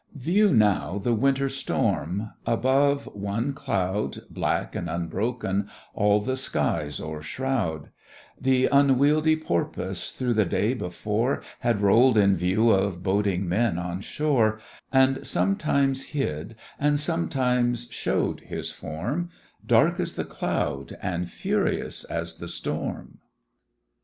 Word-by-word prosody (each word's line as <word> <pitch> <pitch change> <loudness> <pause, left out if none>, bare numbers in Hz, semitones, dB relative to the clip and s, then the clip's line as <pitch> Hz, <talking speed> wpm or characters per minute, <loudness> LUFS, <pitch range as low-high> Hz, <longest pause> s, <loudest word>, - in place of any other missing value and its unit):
View 180 +9 +3
now 105 - +2
the 120 +4 0
Winter 135 +4 +2
storm! 105 - -1 0.2
above, 140 +4 +2
one 105 +7 -2
cloud, 105 -8 -1
Black - - -1
and - - -3
unbroken, 100 +4 -2 0.2
all 105 0 +3
the 130 +5 -2
skies 75 - -1
o'ershroud: 80 - -3 0.5
Th' 130 -1 +3
unwieldy 145 +3 +4
porpoise 85 - -2
through 125 -2 -1
the 110 -1 +3
day 105 +7 +1
before 110 +3 -2 0.2
Had 120 -5 +1
roll'd 115 +4 +5
in 100 -2 +5
view 95 +6 +3
of 95 -3 +1
boding 100 -1 +1
men 100 +1 +1
on 90 +1 -4
shore; 115 -5 +1 0.3
And 130 0 +3
sometimes 140 -9 +1
hid 115 - -3 0.2
and 145 0 +2
sometimes 120 - 0
show'd - - -1
his - - -6
form, 120 - -4 0.3
Dark - - +3
as - - -1
the - - -3
cloud, 70 0 -3
and 90 -1 -3
furious - - -1
as 85 0 -3
the 85 - -6
storm. 85 - -4
110 Hz, 120 wpm, -26 LUFS, 95-135 Hz, 0.5 s, roll'd